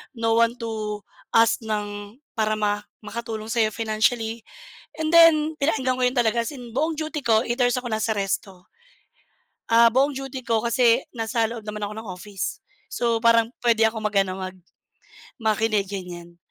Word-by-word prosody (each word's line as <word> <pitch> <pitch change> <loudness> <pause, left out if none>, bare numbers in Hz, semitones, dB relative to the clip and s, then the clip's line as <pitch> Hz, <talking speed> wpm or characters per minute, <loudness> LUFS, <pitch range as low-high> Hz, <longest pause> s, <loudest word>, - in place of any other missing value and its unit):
no 225 -1 0
one 230 +1 +3
to 215 -3 -4 0.3
ask 225 +2 +5
ng 205 -2 -5 0.2
para 215 -2 +1
ma 205 0 0 0.2
makatulong 225 -1 -5
sa'yo 225 -1 +1
financially. 225 +1 0 0.6
And 310 - 0
then 320 -2 +6
pinakinggan 265 -3 0
ko - - -1
yun 250 - 0
talaga 235 -2 +2
as - - -4
in 245 -3 -9
buong 310 +7 0
duty 310 0 -4
ko 220 -1 +4
8 240 0 -3
hours 245 -1 +3
akong 250 -1 -3
nasa 220 0 0
resto. 195 -2 -4 1.0
Ah, 230 0 +6
buong 275 +3 +2
duty 270 -1 -5
ko 230 -2 0
kasi 235 +1 +3
nasa 230 0 -1
loob 230 +1 -3
naman 210 0 -4
ako 205 - -5
ng 220 - -8
office. 190 +1 -5 0.3
So, 235 -1 +1
parang 230 0 +4
pwede 225 -2 +4
akong 220 0 -5
mag 210 -1 -1
ano, 185 -1 -2
mag 185 0 -6 0.8
makinig, 215 -1 +1
ganyan. 175 -3 -7
225 Hz, 165 wpm, -24 LUFS, 210-245 Hz, 1.0 s, then